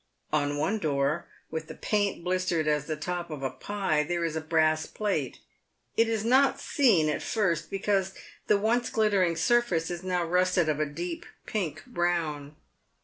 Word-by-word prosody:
On 145 Hz, -1 st, +1 dB
one 190 Hz, +9 st, 0 dB
door, 145 Hz, 0 st, 0 dB, 0.2 s
with 160 Hz, -1 st, -4 dB
the 160 Hz, -, -8 dB
paint 205 Hz, -4 st, -1 dB
blis 185 Hz, 0 st, 0 dB
tered 160 Hz, -2 st, +1 dB
as 150 Hz, -1 st, +1 dB
the 155 Hz, -, -1 dB
top 175 Hz, +3 st, -4 dB
of 150 Hz, -3 st, -6 dB
a 135 Hz, -, -1 dB
pie, 195 Hz, -7 st, -1 dB
there 170 Hz, +2 st, -1 dB
is 160 Hz, -1 st, -2 dB
a 160 Hz, -, -1 dB
brass 155 Hz, 0 st, +2 dB
plate. 210 Hz, -2 st, -2 dB, 0.6 s
It 230 Hz, 0 st, +3 dB
is 220 Hz, -1 st, -1 dB
not 270 Hz, +3 st, +4 dB
seen 225 Hz, -, +3 dB
at 150 Hz, -, -1 dB
first, 185 Hz, -8 st, 0 dB
because 195 Hz, -1 st, 0 dB, 0.3 s
the 210 Hz, -, +5 dB
once 235 Hz, +4 st, +1 dB
glittering 200 Hz, -6 st, +2 dB
surface 175 Hz, -3 st, +2 dB
is 175 Hz, -1 st, -4 dB
now 180 Hz, -1 st, 0 dB
rusted 180 Hz, -1 st, +2 dB
of 150 Hz, -1 st, 0 dB
a 155 Hz, -, +1 dB
deep 170 Hz, +4 st, -5 dB, 0.2 s
pink 190 Hz, -8 st, -3 dB
brown. 165 Hz, -, -1 dB
175 Hz, 175 wpm, -28 LUFS, 155-205 Hz, 0.6 s, the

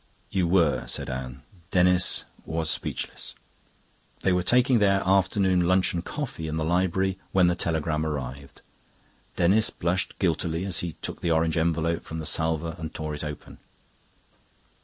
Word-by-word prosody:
"You 95 Hz, -3 st, +1 dB
were," 85 Hz, -4 st, +2 dB
said -, -, -2 dB
Anne. 65 Hz, 0 st, -6 dB, 0.3 s
Denis 90 Hz, -2 st, +4 dB, 0.2 s
was 80 Hz, -1 st, 0 dB
speechless. -, -, -3 dB, 0.9 s
They 95 Hz, -, +2 dB
were 90 Hz, -, +2 dB
taking 125 Hz, +5 st, +3 dB
their 100 Hz, -1 st, +3 dB
after 95 Hz, +1 st, +2 dB
luncheon 90 Hz, -2 st, +2 dB
coffee 120 Hz, -, -5 dB
in 80 Hz, 0 st, -3 dB
the 80 Hz, -, -1 dB
library 95 Hz, +2 st, +1 dB
when 95 Hz, -2 st, +5 dB
the 85 Hz, -, +3 dB
telegram 80 Hz, -2 st, -1 dB
arrived. 70 Hz, -2 st, -5 dB, 0.7 s
Denis 100 Hz, +6 st, +3 dB
blushed 85 Hz, +1 st, -2 dB
guiltily 85 Hz, -1 st, 0 dB
as 95 Hz, -3 st, 0 dB
he 85 Hz, -2 st, -3 dB
took -, -, -5 dB
the 85 Hz, -, -1 dB
orange 80 Hz, 0 st, +2 dB
envelope 85 Hz, 0 st, 0 dB
from 80 Hz, -, -7 dB
the 80 Hz, -, -5 dB
salver 80 Hz, +1 st, 0 dB
and 80 Hz, 0 st, -5 dB
tore 75 Hz, -2 st, -4 dB
it 75 Hz, -, -5 dB
open. 75 Hz, -1 st, -8 dB
85 Hz, 150 wpm, -26 LUFS, 80-95 Hz, 0.9 s, when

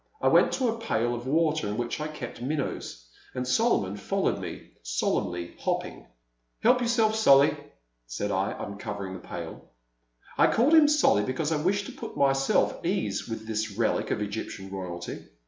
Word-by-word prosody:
I -, -, +3 dB
went -, -, +5 dB
to 260 Hz, -, +1 dB
a 230 Hz, 0 st, -1 dB
pail 120 Hz, -, 0 dB
of 120 Hz, +1 st, -5 dB
water 155 Hz, -1 st, +1 dB
in 105 Hz, +1 st, -3 dB
which 120 Hz, +5 st, -3 dB
I 150 Hz, -, -2 dB
kept 150 Hz, -6 st, -8 dB
minnows, 130 Hz, -, -3 dB, 0.3 s
and 125 Hz, 0 st, -2 dB
Solomon 125 Hz, -, +2 dB
followed 105 Hz, -, -1 dB
me, -, -, -8 dB
solemnly 85 Hz, +8 st, -2 dB
hopping. -, -, -3 dB, 0.6 s
Help 250 Hz, +2 st, +5 dB
yourself, 230 Hz, -2 st, +2 dB
Solly," 140 Hz, -10 st, +6 dB, 0.5 s
said 100 Hz, +13 st, -3 dB
I, 95 Hz, +1 st, 0 dB
uncovering 100 Hz, -1 st, -5 dB
the -, -, -7 dB
pail. -, -, -8 dB, 0.8 s
I -, -, +6 dB
called 260 Hz, +8 st, +3 dB
him 315 Hz, -2 st, +8 dB
Solly 295 Hz, -, +4 dB
because 140 Hz, +7 st, -2 dB
I 150 Hz, -2 st, 0 dB
wished 200 Hz, +4 st, +1 dB
to -, -, -7 dB
put -, -, -8 dB
my 140 Hz, -1 st, +4 dB
self 135 Hz, 0 st, +1 dB
at -, -, -11 dB
ease -, -, -1 dB
with 115 Hz, -1 st, -5 dB
this 110 Hz, -2 st, -3 dB
relic 115 Hz, -, +1 dB
of 105 Hz, -, -1 dB
Egyptian 100 Hz, -2 st, -6 dB
Royalty. 90 Hz, -3 st, -6 dB
125 Hz, 175 wpm, -27 LUFS, 100-165 Hz, 0.8 s, him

